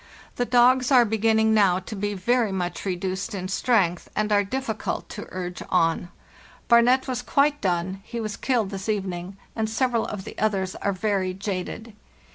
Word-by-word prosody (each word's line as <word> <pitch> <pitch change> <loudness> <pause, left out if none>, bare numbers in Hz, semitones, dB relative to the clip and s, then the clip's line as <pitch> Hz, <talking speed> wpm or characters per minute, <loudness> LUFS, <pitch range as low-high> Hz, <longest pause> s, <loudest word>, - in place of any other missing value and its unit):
The 245 - +1
dogs 250 +2 +4
are 250 -3 +7
begin 220 0 +2
ning 220 0 +3
now 195 -4 +4
to 190 +3 -7
be 205 +1 -2
very 230 +3 +1
much 180 -1 -3
reduced 190 +1 -3
in 185 -1 -4
strength 190 -5 +1
and 215 0 0
are 205 -1 +4
difficult 220 +1 -3
to 210 - -7
urge 180 -1 -5
on. 170 -1 +1 0.6
'Barnet' 245 +3 +5
was 250 -2 -2
quite 290 +3 +2
done 185 +1 -1
(he 235 +2 -6
was 215 -2 -3
killed 235 -7 0
this 195 +2 -5
evening), 190 -2 -3 0.2
and 220 -1 -1
several 235 0 0
of 205 -2 -5
the - - -9
others 195 -3 0
are 200 - -1
very 190 -1 -1
jaded. 200 +3 -5
205 Hz, 175 wpm, -24 LUFS, 185-235 Hz, 0.6 s, are